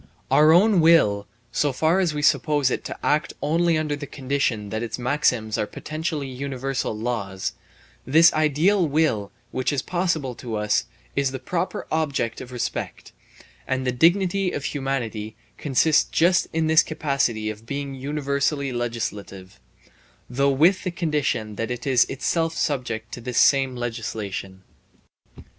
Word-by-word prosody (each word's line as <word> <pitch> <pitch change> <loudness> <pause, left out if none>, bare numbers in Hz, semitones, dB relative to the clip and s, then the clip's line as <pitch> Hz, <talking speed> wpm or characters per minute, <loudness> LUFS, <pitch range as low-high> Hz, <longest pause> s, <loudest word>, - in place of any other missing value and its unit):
Our 155 +1 +6
own 195 +3 +5
will, 105 -12 +4 0.2
so 145 - +1
far 160 +7 +2
as 180 -4 +2
we 150 0 -4
suppose 145 -3 +2
it - - -2
to - - -6
act 155 +3 +1
only 165 +2 +2
under 155 -2 -1
the 145 0 -7
condition 130 -7 -2
that 110 - -2
its 115 -2 -4
maxims 125 -4 0
are 105 - 0
potentially 155 0 -4
universal 130 -3 -3
laws, 105 -5 -3 0.5
this 160 +5 +5
ideal 155 +5 +2
will 140 -9 0 0.2
which 130 +2 -1
is 140 -3 -1
possible 170 -7 -1
to 115 -2 -6
us 105 0 +1 0.3
is 140 -1 +1
the 130 - -5
proper 170 +8 -3
object 140 -7 -1
of 125 - -9
respect; 125 -2 -4 0.6
and 130 0 -1
the 125 - +1
dignity 180 +6 +2
of 145 - -4
humanity 120 -7 -3 0.2
consists 150 +2 +3
just 175 +2 +3
in 160 0 0
this 160 0 +6
capacity 135 -9 -1
of 110 +2 -12
being 140 0 -4
universally 140 0 -1
legislative, 105 - -5 0.7
though 140 +3 +1
with 165 +8 +3
the 185 - -1
condition 150 - -2
that 115 - -2
it 125 0 -5
is 130 -3 +4
itself 165 +4 -1
subject 120 -6 -2
to 120 - -7
this 125 0 -4
same 135 -2 +4
legislation. 110 -5 -5
135 Hz, 150 wpm, -23 LUFS, 120-155 Hz, 0.7 s, Our